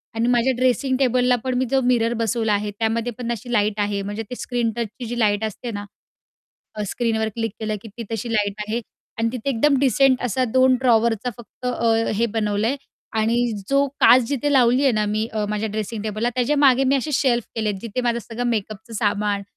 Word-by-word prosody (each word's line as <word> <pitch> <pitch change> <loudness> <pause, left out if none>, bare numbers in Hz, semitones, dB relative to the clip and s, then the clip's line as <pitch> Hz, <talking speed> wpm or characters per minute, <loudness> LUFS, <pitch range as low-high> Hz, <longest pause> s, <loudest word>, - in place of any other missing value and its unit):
आणि 230 +1 +1
माझ्या 245 +1 +3
ड्रेसिंग 255 +1 +1
टेबलला 250 -1 +3
पण 260 -1 -1
मी 260 - +1
जो 270 - +3
मिरर 240 -2 +2
बसवला 225 -1 0
आहे. 205 0 -1
त्यामध्ये 225 +3 -1
पण 240 -1 -3
अशी 235 +1 -5
लाईट 210 -1 +1
आहे, 205 -1 0
म्हणजे 205 +3 -4
ते 250 - -5
स्क्रीन 240 -2 -1
टचची 235 +1 -5
जी 240 +1 -4
लाईट 210 -1 +2
असते 220 +3 -4
ना 205 -1 -5 0.9
अ, 210 - -3
स्क्रीनवर 220 -1 0
क्लिक 225 -1 -2
केलं, 215 -1 -2
की 225 - -9
ती 235 - -5
तशी 225 +1 -3
लाईट 205 -2 +1
आहे, 230 +2 -1 0.4
आणि 225 0 +1
तिथे 250 +1 -4
एकदम 275 +3 +3
डिसेंट 270 -1 +3
असा 250 +1 0
2 260 0 +5
ड्रॉवरचा 235 -1 +2
फक्त 240 +2 -10
अ 235 -2 +1 0.2
हे 235 +2 +2
बनवलंय, 215 +4 0 0.4
आणि 225 +2 +1 0.3
जो 275 +1 +3
काच 255 +1 +7
जिथे 285 +1 0
लावलीये 260 +1 +4
ना 215 -1 +1
मी. 215 +2 -1
अ, 215 -1 -1
माझ्या 210 +1 -2
ड्रेसिंग 215 +1 -4
टेबलला 215 +2 -1
त्याच्या 255 +4 +1
मागे, 270 -2 +5
मी 270 +1 +3
असे 275 +3 -2
शेल्फ 245 -4 +2
केलेत. 215 -2 -1
जिथे 230 +3 -3
माझं 240 -1 0
सगळं 235 +2 -5
मेकअपचं 215 +1 -4
सामान 205 -1 0
230 Hz, 200 wpm, -22 LUFS, 215-250 Hz, 0.9 s, काच